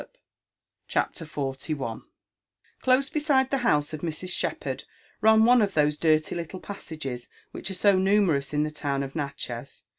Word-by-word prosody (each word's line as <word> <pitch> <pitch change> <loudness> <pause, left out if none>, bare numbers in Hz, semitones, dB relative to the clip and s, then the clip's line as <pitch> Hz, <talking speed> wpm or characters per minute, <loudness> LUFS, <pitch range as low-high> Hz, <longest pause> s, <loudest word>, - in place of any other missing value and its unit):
mi - - -12 0.8
CHAPTER 165 - -1
XLL 135 -4 -4 0.8
Close 260 +1 +3
beside 290 -4 +2
the 275 - +2
house 150 -12 +2
of 155 - -5
Mrs. 170 +2 -4
Shepherd - - -2 0.4
ran 220 0 +6
one 245 0 +6
of 200 -2 0
those 150 -1 +3
dirty 155 0 +2
little 170 +2 -5
paisages 145 -12 -6 0.2
which - - -5
are 190 - -3
so 200 0 +4
namerpus 185 -8 +2
io 150 0 +1
the 155 - -2
town 140 -2 -2
of 135 0 -7
Natchez. 140 -3 -5
160 Hz, 155 wpm, -26 LUFS, 145-205 Hz, 0.8 s, ran